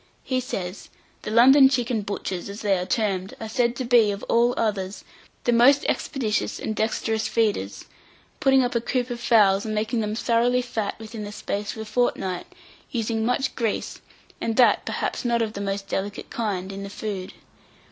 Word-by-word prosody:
He 255 -1 0
says: 195 -7 -5 0.3
"The - - -5
London 265 +5 +7
chicken 245 -4 0
butchers, 195 -2 -4
as 200 +2 -7
they 200 -2 +2
are 180 - -4
termed, 195 -2 -1
are 225 - -5
said 235 +1 +1
to 255 - -3
be, 235 -3 +5
of 200 0 -4
all 240 +1 +2
others, 200 -3 -2 0.4
the 240 - +2
most 260 +5 +5
expeditious 230 -7 -1
and 220 - -3
dexterous 220 0 -1
feeders, 205 - -1 0.5
putting 270 -1 +4
up 245 - -1
a 235 - +1
coop 250 +1 -1
of 240 - -4
fowls, 205 -4 +4
and 215 -1 -3
making 220 +2 -1
them 210 -1 -2
thoroughly 240 +2 +2
fat 220 -4 -3
within 220 0 -8
the 205 - -6
space 205 0 -4
of 220 - -5
a - - -10
fortnight, 210 -6 -1 0.4
using 225 -3 -1
much 250 +3 0
grease, 225 -4 -2 0.4
and 225 - -1
that 250 0 +4
perhaps - - -2
not 235 -1 +1
of 215 -1 -4
the 200 - -5
most 195 0 -3
delicate 200 +1 -4
kind, 195 -5 -2
in 195 0 -6
the 200 - -6
food. 195 -2 -5
220 Hz, 185 wpm, -24 LUFS, 200-240 Hz, 0.5 s, London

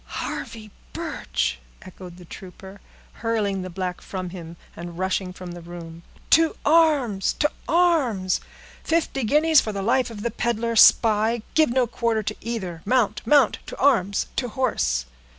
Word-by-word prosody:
"Harvey 215 -3 -6 0.2
Birch!" 60 0 -3 0.2
echoed 180 -1 -11
the 180 - -13
trooper, 190 +2 -11 0.4
hurling 215 -4 -1
the 185 - -6
black 180 0 -4
from 185 -2 -6
him, 170 -2 -9 0.2
and 170 0 -8
rushing 185 0 -1
from 180 -1 -9
the 175 0 -9
room. 170 -1 -10 0.3
"To 325 0 +5
arms! 290 - +3
to 295 - 0 0.2
arms! 285 - +2 0.4
Fifty 320 -5 0
guineas 300 +5 +4
for 215 - -4
the 200 -1 -4
life 250 +3 +2
of 210 -3 -8
the 235 - -1
peddler 235 0 -1
spy—give 225 +6 +4
no 250 +1 +2
quarter 230 -2 -1
to 215 +1 -3
either. 190 -8 -5
Mount, 245 0 +1
mount! 275 -3 +4
to - - -8
arms! 210 -8 +2
to 250 - 0
horse!" 75 - 0
215 Hz, 150 wpm, -23 LUFS, 180-250 Hz, 0.4 s, To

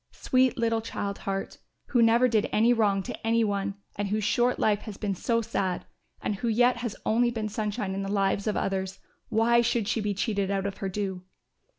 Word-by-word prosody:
Sweet 255 0 +2
little 230 -1 +1
child 200 -3 -4
heart, 195 0 -3 0.3
who 245 - +3
never 230 +2 +5
did 220 -3 +1
any 230 +3 +4
wrong 205 -4 +2
to - - -5
any 230 0 +3
one 200 -1 -1 0.2
and 205 0 -2
whose 210 +2 -1
short 240 +4 +2
life 210 -2 +2
has 210 -3 -8
been 205 -2 -1
so 230 +5 0
sad 185 -4 -2 0.4
and 205 - -1
who 235 - -3
yet 245 +2 +3
has 235 -3 -4
only 240 +2 +3
been 225 -2 -3
sunshine 210 -1 -2
in 195 - -3
the 195 0 -3
lives 200 0 +1
of 215 - 0
others, 190 -1 -2 0.3
why 235 +1 +4
should 230 -3 0
she 225 0 0
be 205 -1 -1
cheated 200 -1 -1
out 195 -1 -1
of 200 -1 -3
her 195 - -3
due?" 190 -1 -3
210 Hz, 210 wpm, -27 LUFS, 195-230 Hz, 0.4 s, never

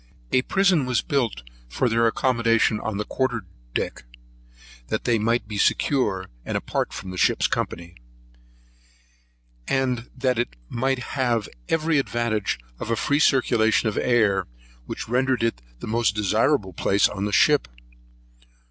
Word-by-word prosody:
A 130 - +4
prison 180 -3 +2
was 125 -2 +1
built 120 - -1 0.3
for 125 - 0
their 115 0 +3
accommodation 115 -2 +2
on 110 -2 -3
the 105 - -2
quarter 125 -5 -1 0.3
deck, - - -2 0.8
that - - -2
they 115 -2 +2
might 115 +1 0
be 105 -1 -4
secure, 105 -10 +1 0.2
and - - -2
apart - - -2
from 95 - -7
our 90 - -5
ship's - - +3
company; 85 0 -2 1.7
and 125 -3 0
that 125 -2 +1
it 120 - -2
might 130 +2 0 0.2
have 120 -5 0 0.2
every 160 -1 +2
advantage 115 -5 -1 0.2
of - - -5
a 115 - +2
free 145 +6 +1
circulation 115 -6 +3
of 105 - -5
air, 105 -6 +2 0.4
which - - -5
rendered 125 +1 +1
it 115 - -1 0.2
the - - -6
most 115 -1 +1
desirable 105 0 +1
place 95 +4 +3
in 100 0 -4
the 105 - -2
ship. 75 - +4
115 Hz, 145 wpm, -24 LUFS, 105-130 Hz, 1.7 s, A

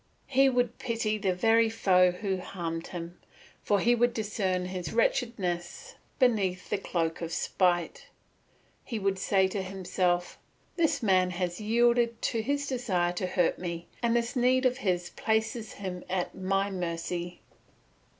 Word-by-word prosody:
He 270 0 +4
would 245 -2 0
pity 225 -3 -1
the 190 -2 0
very 225 +4 +4
foe 185 -4 +4
who 190 +1 -2
harmed 170 -3 -5
him, 175 0 -7 0.4
for 205 - +2
he 240 +4 +4
would 240 0 +2
discern 195 -4 -1
his 180 -3 -5
wretchedness 230 - -1 0.2
beneath 200 -8 +1
his - - +1
cloak 165 -2 -1
of 165 -1 -4
spite. 175 -3 0 0.8
He 235 - -4
would 195 -2 0
say 190 0 +3
to 195 +1 -2
himself, 185 -2 -1 0.4
"This 325 -7 +1
man 185 -3 +3
has 175 +1 -3
yielded 235 +1 +2
to 225 - 0
his 285 +5 -1
desire 195 -10 0
to 180 +1 -2
hurt 180 -2 +1
me, 170 -1 -5
and 235 -1 +2
this 235 +3 0
need 255 +1 +3
of 255 0 +2
his 180 -5 -1
places 220 0 -1
him 185 -2 -6
at 180 -1 -1
my 195 +1 0
mercy." 175 -1 -4
195 Hz, 150 wpm, -29 LUFS, 180-230 Hz, 0.8 s, He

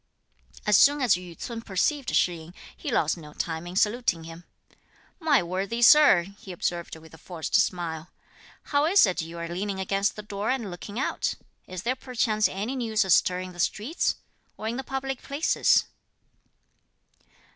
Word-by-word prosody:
As 210 - +4
soon 290 +1 +5
as 250 -7 +4
Yü 180 -2 -5
ts'un 230 -1 -6
perceived 235 +7 -1
Shih 180 - +3
yin, 165 +1 -11 0.2
he - - -5
lost 160 +2 +1
no 150 -3 -12
time 165 +1 -4
in 175 - -8
saluting 210 -4 +1
him. 165 +1 -11 0.7
"My 300 - +3
worthy 195 +7 -2
Sir," 285 -9 +7 0.2
he 190 - -10
observed 175 -1 -3
with 160 0 -15
a 160 - -13
forced 165 -2 -7
smile; 165 -2 0 0.6
"how 285 +1 +4
is 385 -2 +6
it 185 -4 -1
you 165 +1 -8
are 170 0 -4
leaning 190 +3 -3
against 195 +1 0
the 210 - -8
door 205 0 -4
and 235 -7 -1
looking 200 +4 -8
out? 270 - -1 0.3
Is 185 0 -7
there 250 +2 0
perchance 230 -5 0
any 210 +8 -4
news 220 -4 0
astir 180 0 +3
in 185 0 -7
the 175 - -14
streets, 220 - 0 0.4
or 220 - -5
in 235 +2 -2
the 265 - -4
public 270 0 -4
places?" 290 +4 +2
195 Hz, 170 wpm, -26 LUFS, 175-245 Hz, 0.7 s, Sir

